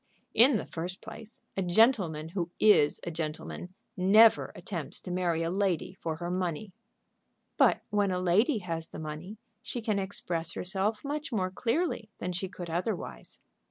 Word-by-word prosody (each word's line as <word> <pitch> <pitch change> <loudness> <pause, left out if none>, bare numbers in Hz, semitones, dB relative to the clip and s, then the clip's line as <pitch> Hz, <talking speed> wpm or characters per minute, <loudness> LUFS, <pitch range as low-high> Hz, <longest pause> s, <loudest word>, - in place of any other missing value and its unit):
"In 245 +4 +6
the 210 - -1
first 175 +3 -5
place, 220 0 -10
a 195 - 0
gentleman 180 -5 +3
who 175 -1 -2
is 205 -9 +5
a 170 - -3
gentleman 160 +3 -5 0.2
never 210 +4 +6
attempts - - -5
to 180 - -6
marry 175 -2 0
a 165 - -1
lady 185 -2 0
for 165 -4 -4
her 175 +2 -4
money." 180 +1 -2 0.8
"But - - +4
when 205 -1 +2
a 180 -1 0
lady 200 - +3
has 165 -2 -3
the - - -10
money 155 +7 -6 0.2
she 250 - -4
can 215 -3 0
express 175 -4 -2
herself 195 +6 -1
much 295 0 -3
more 185 -5 0
clearly 235 - -1
than 180 - -3
she 185 +2 -3
could 180 -2 -7
otherwise." 170 - -4
185 Hz, 160 wpm, -30 LUFS, 170-215 Hz, 0.8 s, In